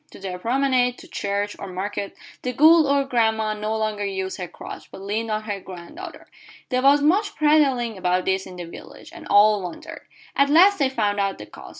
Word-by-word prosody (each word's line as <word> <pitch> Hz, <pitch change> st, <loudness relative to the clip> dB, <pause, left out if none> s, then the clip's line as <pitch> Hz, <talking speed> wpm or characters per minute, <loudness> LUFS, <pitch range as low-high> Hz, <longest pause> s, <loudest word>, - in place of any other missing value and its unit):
To -, -, -14 dB
the 185 Hz, -2 st, -6 dB
promenade, 250 Hz, +2 st, +1 dB
to -, -, -13 dB
church, 205 Hz, +1 st, -3 dB
or -, -, -6 dB
market, 200 Hz, +2 st, -5 dB, 0.3 s
the 250 Hz, -, -3 dB
good 315 Hz, +3 st, +6 dB
old 275 Hz, -1 st, +1 dB
grandame 220 Hz, -2 st, +1 dB
no 215 Hz, +1 st, -1 dB
longer 215 Hz, -1 st, -2 dB
used 190 Hz, -1 st, -3 dB
her 180 Hz, -, -4 dB
crutch, -, -, -10 dB
but -, -, -10 dB
leaned 215 Hz, +3 st, -3 dB
on 215 Hz, 0 st, -2 dB
her 205 Hz, -2 st, -4 dB
granddaughter. 190 Hz, -, -10 dB, 0.4 s
There 255 Hz, -1 st, 0 dB
was 285 Hz, +2 st, +5 dB
much 405 Hz, +7 st, +2 dB
prattling 275 Hz, -8 st, +2 dB
about 180 Hz, 0 st, 0 dB
this 190 Hz, 0 st, -1 dB
in 185 Hz, -, -10 dB
the 175 Hz, -, -6 dB
village, 170 Hz, -, -12 dB
and -, -, -11 dB
all 210 Hz, 0 st, +5 dB
wondered. 180 Hz, -2 st, -8 dB, 0.3 s
At 280 Hz, 0 st, +3 dB
last 370 Hz, +6 st, +6 dB
they 275 Hz, -2 st, +2 dB
found 210 Hz, -5 st, -1 dB
out 195 Hz, -1 st, -1 dB
the 105 Hz, -, -9 dB
cause. -, -, -13 dB
215 Hz, 205 wpm, -23 LUFS, 195-275 Hz, 0.4 s, good